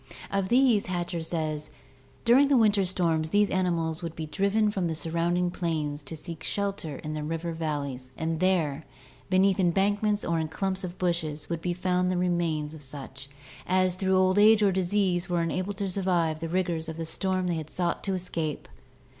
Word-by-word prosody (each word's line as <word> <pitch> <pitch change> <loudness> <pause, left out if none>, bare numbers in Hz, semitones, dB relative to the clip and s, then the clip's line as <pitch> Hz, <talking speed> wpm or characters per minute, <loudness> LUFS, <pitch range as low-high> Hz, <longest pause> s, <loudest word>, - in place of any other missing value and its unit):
Of 195 -1 0
these 245 -4 +4
Hatcher 175 -1 -2
says: 155 -2 -3 0.6
"During 255 +5 +6
the 275 -2 +4
winter 210 -4 +4
storms 165 -4 0
these 205 +3 +3
animals 170 -3 0
would 165 -2 -5
be 160 - -4
driven 200 +6 +1
from 190 -4 -1
the 160 - -2
surrounding 170 +2 0
plains 155 -4 -2
to 145 +3 -8
seek 165 0 -7
shelter 200 -7 -2
in 155 0 -5
the 155 - -3
river 165 +2 -3
valleys 140 -5 -4
and 160 0 -2
there, 165 -5 +1 0.5
beneath 190 +1 +3
embankments 205 +3 +2
or 170 -1 0
in 160 - -1
clumps 190 +4 -1
of 180 0 -6
bushes, 165 -4 -2
would 165 -1 -2
be 175 0 -1
found 180 0 0
the 185 - 0
remains 170 -4 0
of 155 - -10
such 135 -1 -8 0.4
as, 185 0 +3
through 190 +1 +1
old 185 +1 +3
age 215 0 +6
or 200 - +4
disease, 185 -1 +1
were 175 -1 +1
unable 185 +4 -2
to 200 0 -3
survive 175 -4 0
the 165 0 -4
rigors 170 -2 -1
of 160 - -6
the 165 - -3
storm 185 +2 -1
they 175 - 0
had 160 -2 -4
sought 175 -2 -2
to 195 -1 0
escape." 170 -4 -3
175 Hz, 190 wpm, -27 LUFS, 160-190 Hz, 0.6 s, During